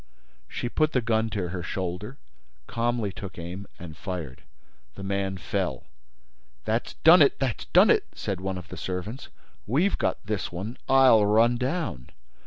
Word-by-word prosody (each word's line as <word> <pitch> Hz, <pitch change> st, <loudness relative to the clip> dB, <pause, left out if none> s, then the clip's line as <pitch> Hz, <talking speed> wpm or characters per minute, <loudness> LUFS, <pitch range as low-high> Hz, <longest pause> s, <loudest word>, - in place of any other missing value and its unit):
She -, -, -4 dB
put 155 Hz, +5 st, +1 dB
the 125 Hz, -, +2 dB
gun 110 Hz, -1 st, +1 dB
to 95 Hz, -5 st, -3 dB
her 90 Hz, 0 st, -4 dB
shoulder, 95 Hz, -, -4 dB, 0.5 s
calmly 115 Hz, -, -1 dB
took 95 Hz, 0 st, -9 dB
aim 90 Hz, +4 st, -7 dB
and 85 Hz, -3 st, -9 dB
fired. 85 Hz, -8 st, -6 dB, 0.5 s
The -, -, -8 dB
man 95 Hz, -1 st, -2 dB
fell. 90 Hz, -, -2 dB, 0.8 s
"That's 110 Hz, +2 st, -1 dB
done 165 Hz, +2 st, +9 dB
it! 140 Hz, -, +5 dB
That's 130 Hz, -5 st, -2 dB
done -, -, +6 dB
it!" -, -, +3 dB
said 95 Hz, -1 st, -3 dB
one 95 Hz, -1 st, -3 dB
of 90 Hz, -, -9 dB
the -, -, -8 dB
servants. 95 Hz, +8 st, -5 dB, 0.4 s
"We've 155 Hz, -, +1 dB
got -, -, 0 dB
this 105 Hz, -2 st, -2 dB
one. 100 Hz, +8 st, -5 dB
I'll 130 Hz, -5 st, +6 dB
run 115 Hz, +3 st, +4 dB
down." 130 Hz, -, -3 dB
105 Hz, 160 wpm, -26 LUFS, 90-120 Hz, 0.8 s, done